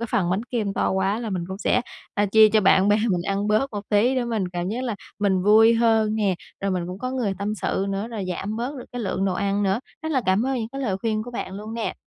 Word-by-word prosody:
cái 235 - -2
phần 175 -3 +1
bánh 190 +4 0
kem 225 -5 -2
to - - 0
quá 190 +2 0
là 225 -3 -4
mình 180 -3 -2
cũng 190 - -6
sẽ, 220 - +2 0.3
a, 205 - +2
chia 215 +2 +7
cho 215 0 +3
bạn 190 0 +4
bè 205 - +5
mình 180 -2 0
ăn 200 +2 -1
bớt 215 +6 +2
một 205 -1 -5
tí 225 +5 +3
để 255 -2 0
mình 220 -6 -1
cảm 175 0 -3
giác 235 +5 -3
là 235 -4 -2 0.2
mình 195 -3 +1
vui 220 +3 +6
hơn 225 -2 +3
nè. 205 -4 +1 0.3
Rồi 195 - -1
mình 180 -2 -1
cũng 180 +2 -6
có 255 - -3
người 240 -7 -1
tâm 205 +2 -2
sự 195 -1 -1
nữa, 195 +3 -2
rồi 220 -5 -4
giảm 200 +4 -3
bớt 245 +5 -3
được 250 - -7
cái 245 - -4
lượng 195 -2 -1
đồ 190 - 0
ăn 200 +1 0
nữa. 195 +3 +1 0.2
Rất 315 0 -2
là 265 - +2
cảm 190 +6 +2
ơn 270 - 0
những 225 -1 -3
cái 275 - -5
lời 210 -8 -1
khuyên 215 +1 -1
của 245 - -8
bạn 210 -5 -5
luôn 215 +3 -7
nè. 230 - -3
210 Hz, 290 wpm, -24 LUFS, 195-230 Hz, 0.3 s, chia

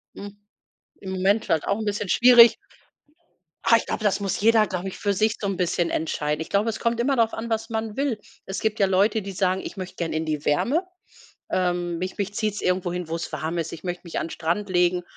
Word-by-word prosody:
Hm. 205 0 -9 0.6
Im 190 - -6
Moment 195 +3 +1
halt 160 - +1
auch 200 - +1
'n 220 - -4
bisschen 205 -2 -2
schwierig 240 +1 +8 1.1
Ah, 230 - +6
ich - - -4
glaub, - - -3
das 205 -2 +1
muss 200 -1 -2
jeder, 220 0 +5
glaub 180 -2 -4
ich, 190 - -5
für 205 -1 0
sich 215 +3 +1
so 200 - -2
'n 195 - -1
bisschen 175 -1 0
entscheiden. 150 -1 -2
Ich 160 - -6
glaube, 205 +3 +1
es 220 - -4
kommt 235 0 0
immer 270 +3 +2
darauf 230 -2 +2
an, 230 +1 -5
was 225 0 -2
man 220 -1 -3
will. 270 -6 -1 0.3
Es 190 - -4
gibt 220 0 -1
ja 200 - +4
Leute, 200 +4 +2
die 195 0 -6
sagen: 190 0 0
„Ich - - -8
möcht 185 -1 -6
gern 170 -2 -3
in 160 +1 -2
die 150 -2 -2
Wärme. 275 - +1 0.7
Ähm, 175 -1 0
mich 185 +2 -5
mich 205 0 -3
zieht's 215 -1 -2
irgendwo 180 -1 0
hin, 180 -2 -4
wo's 165 +1 -4
warm 155 +3 -3
ist. 165 -1 -3
Ich 160 - -8
möcht 180 0 -5
mich 170 - -4
an 155 - -2
'n - - -10
Strand 175 +6 -2
legen 180 -1 +2
195 Hz, 235 wpm, -24 LUFS, 175-220 Hz, 1.1 s, schwierig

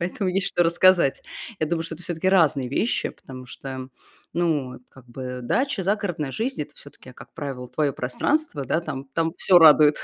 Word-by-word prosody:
поэтому 185 +3 -2
есть 190 +1 0
что 175 - +1
рассказать. 170 -3 +3 0.4
Я 155 - +1
думаю, 165 +1 -2
что 165 - -6
это 165 - -11
всё-таки 175 +1 -2
разные 155 -8 +3
вещи, 215 - 0
потому 130 -1 -12
что, 130 +1 -8 0.4
ну, 155 -7 0
вот 125 - -12
как 130 -2 -17
бы 125 +1 -6
дача, 250 - 0
загородная 175 -8 -1
жизнь- 235 - -2
это 145 0 -12
всё-таки, 135 -2 -14
как - - -15
правило, 135 -5 -6
твоё 145 0 0
пространство, 145 - -1
да, 155 - 0
там 145 -5 -6
там 165 0 0
всё 180 -2 +5
радует, 150 -1 +6
155 Hz, 185 wpm, -24 LUFS, 135-180 Hz, 0.4 s, радует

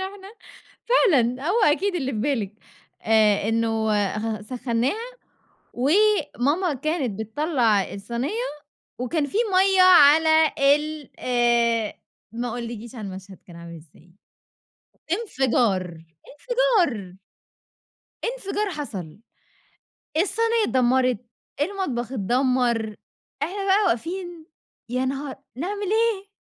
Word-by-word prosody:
إحنا 390 +1 -7 0.5
فعلًا 285 - +2
هو 440 +6 +2
أكيد 380 +4 +2
اللي 270 -6 -2
في 220 - -3
بالِك 225 -5 -1 0.5
آآ، 215 -2 +3
إنه 225 -1 0
آآ، 205 0 0
خ 220 -1 -3
سخنّاها 250 - -2 0.6
وماما 330 - +2
كانت 275 - -2
بِتطلَّع 225 - 0
الصينية 245 - -3 0.5
وكان 290 +4 0
في 285 - -4 0.2
مَيَّة 380 0 +4
على 315 -2 +6 0.2
ال 300 -1 -5
آآ، 235 -3 +1 0.4
ما 240 +1 -3
أقولكيش 235 0 -6
على 215 -4 -6
المشهد 190 0 -9
كان 175 - -13
عامل 170 0 -10
إزاي، 165 +2 -18 1.0
إنفجار، 230 - 0 0.2
إنفجار، 340 - 0 1.2
إنفجار 415 -3 -3
حصل، 210 - -7 1.0
الصينية 455 +6 +1
اتدمّرت، 255 - +2 0.4
المطبخ 290 - -2
اتدمّر، 240 -1 0 0.5
إحنا 395 +3 -4
بقى 395 +2 +3
واقفين 345 +5 -3 0.5
يا 255 +1 0
نهار! 270 +1 -4 0.2
نعمل 395 +9 -4
إيه، 440 -3 +1
260 Hz, 100 wpm, -23 LUFS, 225-370 Hz, 1.2 s, على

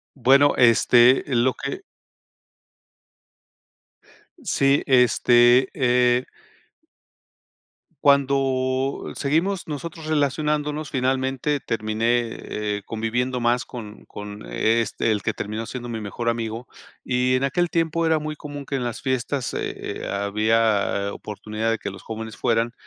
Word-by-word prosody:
Bueno, 140 +3 +4
este 120 +1 +5
lo 130 -1 +2
que 140 -1 -6 2.6
Sí, 140 +1 +2
este, 125 0 +5
eh 125 -1 +2 1.7
Cuando 135 -1 +1
seguimos 170 +7 0
nosotros 160 +1 -6
relacionándonos, 150 0 -1
finalmente 130 +2 0
terminé, 115 +1 0
eh, 105 -1 -4
conviviendo 120 +3 -2
más 120 0 +1
con 110 -4 -10
con 105 0 -9
este, 110 - +1
el 105 -2 0
que - - -1
terminó 110 +2 -5
siendo 120 0 -6
mi 115 -2 -4
mejor 110 +3 -5
amigo, 115 +1 -3 0.4
y 125 0 +1
en 130 - 0
aquel 175 +6 +1
tiempo 165 0 0
era 160 -1 +3
muy 155 0 -4
común 145 -1 -8
que 140 - -4
en 130 - -2
las 120 -1 -4
fiestas, 130 +1 -2
eh - - -2 0.3
eh, - - -5
había 100 0 +1
oportunidad 105 +1 -4
de 115 - 0
que - - -4
los 95 - -11
jóvenes 110 0 -7
fueran, 115 -1 0
125 Hz, 120 wpm, -23 LUFS, 115-140 Hz, 2.6 s, este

